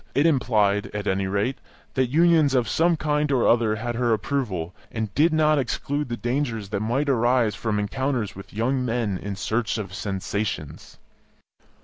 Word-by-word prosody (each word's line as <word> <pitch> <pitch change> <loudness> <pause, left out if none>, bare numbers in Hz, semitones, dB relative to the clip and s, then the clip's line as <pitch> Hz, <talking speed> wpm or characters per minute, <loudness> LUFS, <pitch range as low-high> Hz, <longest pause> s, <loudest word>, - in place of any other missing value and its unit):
It 140 - +3
implied, 105 -9 +2
at 105 0 -3
any 95 -1 0
rate, 100 +7 -1 0.3
that 130 -1 +1
unions 160 -1 +4
of 125 -3 +2
some 170 +8 +2
kind 150 -1 0
or 130 -3 +3
other 115 -2 +3
had 120 +2 -3
her 120 -1 +1
approval, 105 -7 -2 0.2
and 110 -3 -4
did 160 +3 +4
not 155 -1 +3
exclude 145 +2 -2
the 120 - -3
dangers 120 -5 -2
that 100 -1 -2
might 120 +7 0
arise 120 -3 +2
from 105 +1 -2
encounters 125 +1 -2
with 95 - -11
young 125 +5 0
men 115 -6 -1
in 100 0 -5
search 110 +3 -1
of 95 -4 -5
sensations. 95 -5 -4
120 Hz, 165 wpm, -24 LUFS, 105-135 Hz, 0.3 s, unions